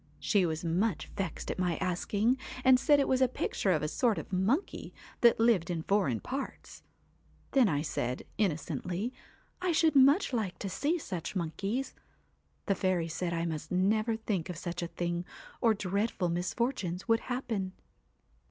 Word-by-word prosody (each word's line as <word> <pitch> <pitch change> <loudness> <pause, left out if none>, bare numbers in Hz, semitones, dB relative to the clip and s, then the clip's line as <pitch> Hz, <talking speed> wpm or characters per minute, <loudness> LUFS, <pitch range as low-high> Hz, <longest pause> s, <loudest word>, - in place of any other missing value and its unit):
She 195 -5 +2
was 160 +1 -3
much 180 +2 0
vexed 185 -5 -3
at - - -5
my 175 -3 +1
asking, 205 +7 0 0.2
and 260 -1 +6
said 290 +1 +4
it 275 - +2
was 260 0 +2
a 260 - +6
picture 210 -5 -1
of 155 -4 +1
a - - +1
sort 225 +6 +1
of - - -7
monkey 215 - 0 0.2
that 235 -2 +5
lived 225 -7 +3
in 165 -2 -2
foreign 175 - +1
parts. 270 +1 -6 0.7
Then 255 -6 +5
I 145 -2 0
said, 125 -5 -2 0.2
innocently, 180 - -1 0.5
I 365 -1 +1
should 320 -1 +3
much 275 +4 +5
like 215 -6 -1
to 195 - -4
see 300 - 0
such 195 - -5
monkeys. 195 +9 -2 0.7
The 200 - +2
fairy 185 -3 0
said 170 +2 -2
I 170 0 -1
must 155 -2 -4
never 215 +5 +2
think 205 -6 -2
of 175 - -5
such 175 +1 -4
a 170 - -2
thing, 175 0 -2 0.4
or 225 -2 +4
dreadful 200 -1 -1
misfortunes 180 +1 -2
would 225 -1 +4
happen. 230 -8 -3
195 Hz, 165 wpm, -31 LUFS, 175-240 Hz, 0.7 s, and